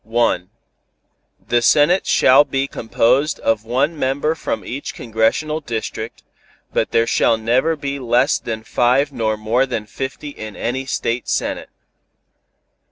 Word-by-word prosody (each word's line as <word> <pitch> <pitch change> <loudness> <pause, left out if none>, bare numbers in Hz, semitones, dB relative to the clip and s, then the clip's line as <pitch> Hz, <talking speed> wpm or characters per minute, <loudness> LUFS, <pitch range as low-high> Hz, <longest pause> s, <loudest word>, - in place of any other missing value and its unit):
The 120 - +2
Senate 150 +9 +4
shall 135 +3 +6
be 135 -2 -1
composed 130 +5 +1
of 110 -1 0
one 135 +8 0
member 140 +4 0
from 160 - -4
each 135 +4 -6
congressional 115 +7 0
district, 115 -4 -5 0.5
but - - +1
there 115 - +2
shall 115 0 +2
never 125 +9 +1
be 140 -1 -4
less 120 -1 +2
than 110 -1 -5
five 130 +5 +2
nor 110 -4 -1
more 115 +5 +1
than 115 -4 -3
fifty 135 +6 -6
in 110 -7 -8
any 130 +3 -3
State 120 -1 -2
Senate. - - -2
125 Hz, 130 wpm, -19 LUFS, 115-140 Hz, 0.5 s, shall